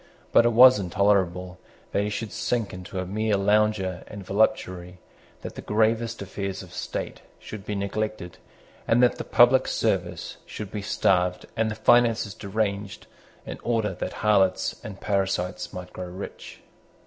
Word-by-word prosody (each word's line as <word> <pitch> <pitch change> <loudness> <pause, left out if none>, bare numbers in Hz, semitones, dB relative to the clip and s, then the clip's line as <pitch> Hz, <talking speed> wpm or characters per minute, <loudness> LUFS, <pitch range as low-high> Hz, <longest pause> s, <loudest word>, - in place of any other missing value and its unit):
But 115 - +6
it 120 - +1
was 125 0 +8
intolerable 90 -1 +1 0.3
that - - +1
he 105 - -1
should 105 +1 -4
sink 110 0 -2
into 90 +1 -8
a 95 - -2
mere 105 +2 0
lounger 100 -2 +1
and 100 -2 -9
voluptuary, 95 -3 0 0.5
that - - -6
the - - -8
gravest 115 +1 0
affairs 100 0 -5
of - - -14
state - - -5 0.2
should 105 -2 -10
be 105 - -2
neglected, 100 -2 -3 0.5
and 120 +2 +4
that 125 - +3
the - - -2
public 125 +2 +5
service - - -1
should 105 -3 -7
be 105 - -4
starved 90 -3 +1
and 110 0 +1
the 110 - -4
finances 115 -4 +3
deranged 100 0 -3 0.4
in - - -7
order 115 -4 0
that 90 - -5
harlots 95 -3 +2
and 100 -2 -8
parasites 95 -2 -1
might 90 -1 -8
grow 90 - -6
rich. 90 +3 -9
100 Hz, 155 wpm, -25 LUFS, 95-110 Hz, 0.5 s, was